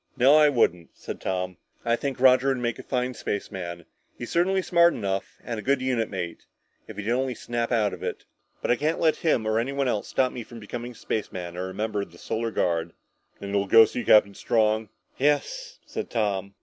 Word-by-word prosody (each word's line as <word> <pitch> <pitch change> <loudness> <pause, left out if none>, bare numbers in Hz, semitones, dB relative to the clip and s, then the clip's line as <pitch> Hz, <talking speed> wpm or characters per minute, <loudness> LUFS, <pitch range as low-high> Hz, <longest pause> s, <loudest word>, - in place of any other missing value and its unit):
"No, 135 +4 +6
I 155 -1 +7
wouldn't," 90 - +1
said - - -7
Tom. 90 -1 -2 0.3
"I 115 0 +3
think 135 +1 -4
Roger 130 +1 +5
would 135 -1 +2
make 120 -2 -2
a - - -8
fine 125 -1 -1
spaceman; 85 -6 -5 0.3
he's 120 - -7
certainly 185 +2 +2
smart 170 -1 +4
enough, 95 -2 -3
and 115 -3 -4
a - - -4
good 135 +4 +2
unit 125 -4 0
mate 90 -4 -5 0.4
if - - -10
he'd 105 +2 -2
only 130 0 0
snap 120 0 -3
out 105 -5 +2
of 90 - -8
it. - - -4 0.4
But - - +1
I 120 - +3
can't 155 +3 0
let 160 -2 +3
him 140 -9 +1
or 110 +1 +2
anyone 135 +3 -1
else 110 -4 -1
stop 130 -1 +1
me 125 - -6
from 115 +1 -11
becoming 120 +3 -6
a - - -21
spaceman 90 -6 -4
or 90 +1 -4
a - - -8
member 105 -1 -1
of 95 - -7
the 85 - -16
Solar 115 +5 -2
Guard." 85 -5 -1 0.5
"Then 100 0 -6
you'll 100 -1 +1
go 115 +2 +8
see 120 - -4
Captain 100 -2 +5
Strong?" 110 0 +1 0.3
"Yes," 475 - 0
said - - -5
Tom. 100 -3 -1
115 Hz, 215 wpm, -26 LUFS, 100-130 Hz, 0.5 s, go